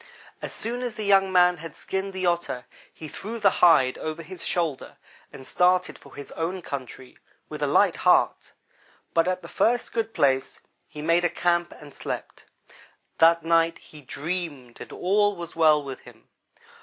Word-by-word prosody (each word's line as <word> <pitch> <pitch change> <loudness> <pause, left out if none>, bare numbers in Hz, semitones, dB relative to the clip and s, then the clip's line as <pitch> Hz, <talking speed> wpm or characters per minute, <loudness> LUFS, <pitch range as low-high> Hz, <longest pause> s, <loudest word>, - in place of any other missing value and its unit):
As - - -5
soon 240 +2 -3
as 245 -3 -4
the 215 - -5
young 195 -1 +4
man 180 -1 +4
had 165 0 -9
skinned 190 +1 -4
the 190 -1 -3
Otter 170 -8 -1 0.3
he 155 - -10
threw 220 +9 -6
the 200 -2 +4
hide 150 -7 +5
over 155 +1 -5
his 180 +2 -9
shoulder 165 -6 -2 0.3
and 130 - -11
started 180 +3 +1
for - - -16
his 145 - -9
own 175 +3 -4
country 130 -2 -8 0.3
with - - -7
a - - +1
light - - +3
heart, - - +2 0.6
but 165 +1 +3
at 185 0 -1
the - - -10
first 240 +1 0
good 225 -1 -1
place 135 -6 +1 0.3
he 150 -1 -9
made 165 +2 +2
a 175 - +3
camp, 175 0 0
and 145 -2 -14
slept. - - -7 0.7
That 165 0 +5
night 165 0 +2
he 150 - -15
dreamed 145 -3 -5
and - - -9
all 205 +2 +1
was 170 -2 -8
well 155 -2 +4
with 135 -1 -7
him. - - -17
170 Hz, 175 wpm, -25 LUFS, 150-185 Hz, 0.7 s, hide